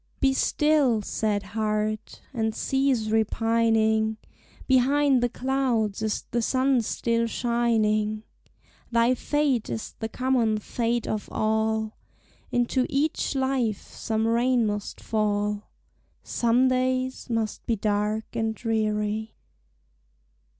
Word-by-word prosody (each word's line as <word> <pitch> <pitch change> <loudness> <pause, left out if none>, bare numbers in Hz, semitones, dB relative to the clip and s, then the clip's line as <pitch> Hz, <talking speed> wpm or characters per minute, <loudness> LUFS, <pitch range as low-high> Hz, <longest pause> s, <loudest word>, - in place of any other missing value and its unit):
Be 270 -1 +3
still, 275 -6 +2
sad 205 -1 -1
heart! 215 +1 -2
and 220 -3 -1
cease 265 -5 +1
repining; 220 0 +2 0.5
Behind 270 +1 +3
the 245 - +2
clouds 245 -5 0
is 215 -1 -1
the 235 - +1
sun 260 +1 +2
still 230 +1 0
shining; 220 -3 +1 0.7
Thy 235 +1 +4
fate 275 -2 0
is 115 -2 -5
the 220 - -3
common 250 -4 +1
fate 235 +2 -1
of 215 -1 -3
all, 220 0 0 0.6
Into 245 +1 +1
each 285 +1 0
life 260 -5 -1
some 220 0 -1
rain 240 +1 +2
must 210 -1 -3
fall, 210 -1 -1 0.5
Some 240 +2 +2
days 255 0 -1
must 225 -2 -2
be 230 - +2
dark 210 +1 -1
and 225 -1 -1
dreary. 215 -1 -1
225 Hz, 110 wpm, -26 LUFS, 215-255 Hz, 0.7 s, Thy